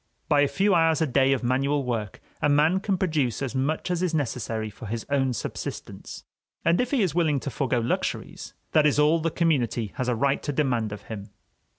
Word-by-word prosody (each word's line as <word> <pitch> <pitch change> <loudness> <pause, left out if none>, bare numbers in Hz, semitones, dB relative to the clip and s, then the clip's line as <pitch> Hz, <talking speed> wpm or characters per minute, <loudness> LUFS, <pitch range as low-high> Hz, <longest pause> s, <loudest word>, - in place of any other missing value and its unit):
By 145 -2 +4
a 145 - +4
few 200 +6 +2
hours 165 -2 +3
a 160 - +2
day 135 0 +3
of 135 -2 0
manual 135 +3 +1
work, 115 -5 -3 0.2
a 150 - +3
man 155 +6 +4
can 195 -1 -1
produce 155 - 0
as 130 -4 -3
much 145 +6 -1
as 175 -1 0
is 175 -3 0
necessary 115 -6 -2
for 110 +2 -10
his 115 +2 -4
own 135 -2 +2
subsistence; 110 - -6 0.4
and 170 +5 +4
if 250 - -2
he 255 -6 +2
is 180 -6 0
willing 160 -5 +2
to 140 - -4
forgo 130 -2 0
luxuries, 115 +1 -3 0.2
that 155 -1 +5
is 145 - +1
all 150 +3 +4
that 165 +1 0
the - - -16
community 125 - +1
has 130 - -1
a 125 - +1
right 140 +4 +1
to 145 - -2
demand 125 -7 0
of 105 0 -7
him. 105 -2 -8
140 Hz, 220 wpm, -25 LUFS, 120-160 Hz, 0.4 s, that